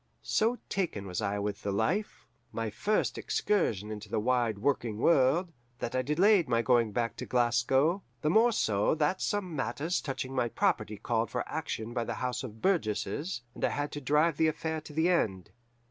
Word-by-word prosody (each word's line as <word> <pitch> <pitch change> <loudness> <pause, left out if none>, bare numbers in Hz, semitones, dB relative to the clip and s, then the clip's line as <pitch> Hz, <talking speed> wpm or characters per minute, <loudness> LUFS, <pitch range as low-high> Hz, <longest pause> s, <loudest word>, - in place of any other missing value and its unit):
So 230 +3 +1
taken 170 - -2
was 90 +2 -3
I 100 -1 -1
with 100 0 -3
the 100 - -2
life 185 - -1 0.3
my 115 -2 -3
first 210 - 0
excursion 110 - 0
into 105 0 -7
the - - 0
wide 120 -2 +1
working 115 -2 0
world 165 - +3 0.2
that 120 - -4
I 130 - +1
delayed 170 +4 +3
my 115 -1 +2
going 120 -3 +3
back 115 +2 -1
to - - -6
Glasgow, 130 +8 +2 0.2
the 150 - +2
more 230 +4 +5
so 105 - +1
that 160 +4 0
some 190 -5 -1
matters 140 +7 -1
touching 135 -1 -4
my 125 -3 0
property 110 - 0
called 115 +2 -1
for 125 - -3
action 130 -7 -4
by 120 -1 -1
the - - -4
House 125 +1 -2
of 110 -3 -9
Burgesses, 145 - -1
and - - -9
I - - +3
had 145 0 -2
to 145 - -5
drive 150 +3 +2
the 160 - +3
affair 160 0 -2
to 155 - -11
the 160 +3 +2
end. 100 - 0
130 Hz, 190 wpm, -30 LUFS, 110-165 Hz, 0.3 s, more